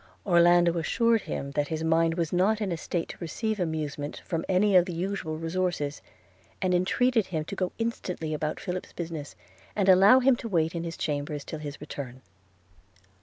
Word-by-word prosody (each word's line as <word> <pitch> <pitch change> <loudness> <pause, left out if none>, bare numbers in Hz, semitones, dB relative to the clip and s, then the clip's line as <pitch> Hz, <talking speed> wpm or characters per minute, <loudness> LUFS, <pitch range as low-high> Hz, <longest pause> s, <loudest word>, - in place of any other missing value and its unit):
– - - -36
Orlando 175 -2 +5
assured 230 +7 +2
him 140 -6 -5
that 145 0 0
his 160 0 -3
mind 165 0 +2
was 165 -2 -2
not 200 +5 +3
in 205 -4 -2
a - - 0
state 165 +1 -3
to - - -8
receive 215 +6 -3
amusement 150 -4 -3
from 165 -2 -2
any 195 +2 +3
of 180 -1 +7
the 180 - -5
usual 175 -3 -3
resources; 165 -3 -2 0.6
and 185 -1 +1
entreated 225 +5 +2
him 160 -4 -3
to 200 - -6
go 185 -2 -1
instantly 180 -8 -3
about 155 0 -2
Philip's 185 -1 -5
business, 165 -4 -6 0.4
and 200 -2 +1
allow 195 +7 +7
him 260 0 +4
to 230 - -6
wait 165 -4 +1
in 170 -1 -3
his 165 -1 -5
chambers 145 -1 -3
till 155 - -6
his 150 -1 -7
return. 135 -3 -7
170 Hz, 185 wpm, -27 LUFS, 155-190 Hz, 0.6 s, of